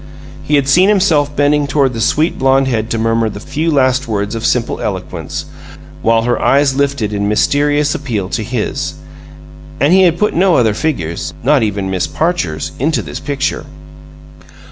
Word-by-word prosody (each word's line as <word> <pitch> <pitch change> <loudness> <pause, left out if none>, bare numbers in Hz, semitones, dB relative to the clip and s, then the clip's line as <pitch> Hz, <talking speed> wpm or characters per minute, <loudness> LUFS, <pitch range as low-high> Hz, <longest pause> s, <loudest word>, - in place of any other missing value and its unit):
He 150 - 0
had 140 -2 +2
seen 180 +8 +4
himself 160 -8 +2
bending 145 0 +2
toward 140 -2 +1
the 115 - -4
sweet 155 +8 +1
blonde 135 0 +3
head 110 -3 -1
to 115 - -1
murmur 115 0 +1
the 105 - -8
few 150 +8 -2
last 130 -3 +2
words 105 -1 -2
of 115 - -4
simple - - 0
eloquence, - - -5 0.6
while 115 0 +2
her 120 0 0
eyes 140 0 +3
lifted 135 -6 -1
in 100 0 -1
mysterious 145 +6 +1
appeal 115 -10 -3
to 115 - -2
his 120 0 -3 0.8
and 145 +6 +3
he 190 - +6
had 175 -2 +3
put 210 - +1
no 180 0 +3
other 110 -4 +3
figures, 85 - -3
not 140 +1 +3
even 100 -3 -2
Miss 95 -1 -1
Parcher's, 155 - -2
into 155 +5 0
this - - -7
picture. 140 -1 -3
135 Hz, 170 wpm, -15 LUFS, 110-150 Hz, 0.8 s, he